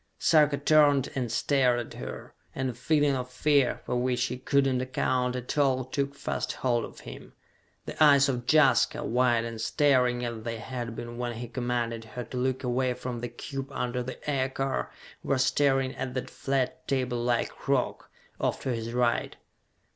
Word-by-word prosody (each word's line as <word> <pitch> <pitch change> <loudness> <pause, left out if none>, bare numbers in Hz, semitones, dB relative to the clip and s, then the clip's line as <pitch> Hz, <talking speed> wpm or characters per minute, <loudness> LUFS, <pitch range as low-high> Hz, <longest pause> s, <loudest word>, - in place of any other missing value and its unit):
Sarka 150 -3 +4
turned 145 -2 +4
and 125 -4 -2
stared 125 0 +2
at - - -10
her, - - -7 0.2
and 130 -1 -1
a - - -10
feeling 145 +3 +2
of 125 -1 -4
fear 140 0 +2
for - - -2
which 125 0 0
he 125 - -2
could 140 +1 +2
not 130 -2 +1
account 125 -1 0
at 125 0 -4
all 130 -3 +2
took 140 +2 -2
fast - - -3
hold 120 -3 0
of - - -12
him. - - -11 0.5
The - - 0
eyes 140 -2 +6
of 120 -3 -2
Jaska, 140 -5 +4
wide 120 -1 +2
and 115 -1 -6
staring 125 -1 +2
as 115 -2 -4
they 115 0 -4
had 120 0 -5
been 120 +1 -7
when 120 -1 -2
he 120 +1 -6
commanded 120 -1 -2
her 125 +2 -6
to 120 +2 -7
look 130 +1 -1
away 125 0 0
from 125 -1 -5
the 120 +1 -4
cube 135 +3 -6
under 125 -1 -2
the 130 +1 -6
aircar, 135 -1 -1 0.3
were 140 - 0
staring 135 0 +2
at 130 -1 -4
that 130 - -4
flat, 135 +4 -2
table 125 -3 0
like 120 +2 -1
rock, 135 -2 0 0.3
off - - 0
to 130 - -1
his 115 0 -4
right. 120 -1 +1
125 Hz, 180 wpm, -28 LUFS, 120-135 Hz, 0.5 s, eyes